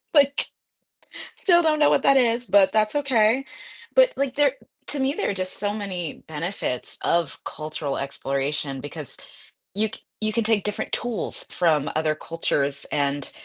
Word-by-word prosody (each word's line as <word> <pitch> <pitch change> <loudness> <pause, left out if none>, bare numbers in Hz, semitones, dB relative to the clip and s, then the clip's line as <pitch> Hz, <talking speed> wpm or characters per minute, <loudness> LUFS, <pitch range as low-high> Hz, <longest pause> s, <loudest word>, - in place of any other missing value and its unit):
like, 280 -1 +4 0.9
still 345 -3 +5
don't 310 -1 +2
know 295 - +6
what - - +3
that 275 - +6
is, 240 -1 +2
but 200 -4 +5
that's 215 -1 +2
okay. 260 -3 +3 0.5
But, - - +7
like, 275 -2 -1
there 285 -2 +4 0.3
to 290 - -4
me, 270 +2 +1
there - - 0
are - - 0
just 185 -1 -5
so 205 0 -1
many 185 -6 -4
benefits 160 -4 -4
of 170 -3 0
cultural 155 -2 -4
exploration 140 0 -2
because 145 0 -8 0.6
you 215 +2 +3
c - - -9 0.2
you 215 0 0
can 230 +1 +1
take 215 -2 +2
different 210 - -3
tools 230 -6 -3
from 155 -5 +2
other 155 0 +1
cultures, 145 -4 -2
and 140 -1 -1
200 Hz, 160 wpm, -24 LUFS, 155-250 Hz, 0.9 s, But